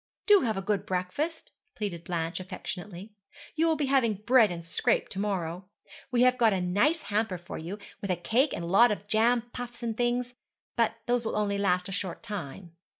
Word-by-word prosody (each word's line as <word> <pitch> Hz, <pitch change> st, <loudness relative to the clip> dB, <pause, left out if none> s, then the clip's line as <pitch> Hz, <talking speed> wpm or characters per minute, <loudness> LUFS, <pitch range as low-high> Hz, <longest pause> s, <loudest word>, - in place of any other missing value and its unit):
'Do 415 Hz, -2 st, +7 dB
have 220 Hz, -5 st, 0 dB
a 195 Hz, -, -3 dB
good 200 Hz, -1 st, 0 dB
breakfast,' 205 Hz, -, -3 dB, 0.2 s
pleaded 185 Hz, -6 st, -4 dB
Blanche 165 Hz, 0 st, -2 dB
affectionately; 185 Hz, +1 st, -7 dB, 0.4 s
'you 325 Hz, +1 st, +2 dB
will 320 Hz, -, +3 dB
be 295 Hz, -1 st, 0 dB
having 260 Hz, -5 st, +2 dB
bread 225 Hz, +2 st, +4 dB
and 170 Hz, -1 st, -6 dB
scrape 165 Hz, -, +1 dB
to 190 Hz, -, -5 dB
morrow. 185 Hz, -3 st, -2 dB, 0.4 s
We 245 Hz, -1 st, +3 dB
have 255 Hz, 0 st, +4 dB
got 225 Hz, -3 st, +5 dB
a 190 Hz, -, 0 dB
nice 205 Hz, -, +2 dB
hamper 210 Hz, -2 st, -1 dB
for 175 Hz, +1 st, -8 dB
you, 170 Hz, +6 st, -6 dB, 0.2 s
with 200 Hz, -, -4 dB
a 180 Hz, -, +2 dB
cake 240 Hz, -, +1 dB
and -, -, -4 dB
a -, -, -4 dB
lot 200 Hz, +7 st, +6 dB
of 205 Hz, -1 st, -3 dB
jam 230 Hz, +3 st, +3 dB
puffs 245 Hz, -1 st, -7 dB
and 230 Hz, -1 st, -2 dB
things; 245 Hz, +1 st, 0 dB, 0.4 s
but 230 Hz, -1 st, +2 dB
those 245 Hz, 0 st, +1 dB
will 220 Hz, -, -2 dB
only 200 Hz, -1 st, 0 dB
last 180 Hz, -2 st, +1 dB
a -, -, -6 dB
short 185 Hz, -2 st, -4 dB
time.' 175 Hz, -3 st, -7 dB
210 Hz, 205 wpm, -28 LUFS, 180-240 Hz, 0.4 s, Do